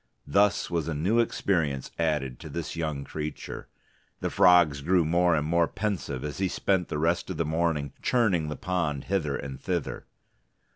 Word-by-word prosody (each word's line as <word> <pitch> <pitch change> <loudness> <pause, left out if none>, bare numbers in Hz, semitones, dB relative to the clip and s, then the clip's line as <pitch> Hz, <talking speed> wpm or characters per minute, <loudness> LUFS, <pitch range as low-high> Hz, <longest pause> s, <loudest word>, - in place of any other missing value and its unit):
Thus 100 +5 +2
was 85 -2 -1
a 80 - -2
new 95 +11 +2
experience 80 - 0
added 75 -6 0
to 80 - -9
this 85 +2 -5
young 75 -4 -2
creature. 75 +1 -6 0.5
The - - -2
frogs 85 -5 +5
grew 85 +2 +3
more 85 +1 +3
and 75 -1 0
more 85 +1 +2
pensive 95 -11 -3
as 75 +4 -5
he 95 - +2
spent 95 -1 0
the - - -3
rest 85 +4 0
of 95 - -4
the 85 - 0
morning 80 -3 0
churning 95 -11 +2
the 75 - -3
pond 85 -7 -2
hither 80 -8 -1
and 65 -2 -7
thither. 90 -4 -3
80 Hz, 175 wpm, -27 LUFS, 75-90 Hz, 0.5 s, frogs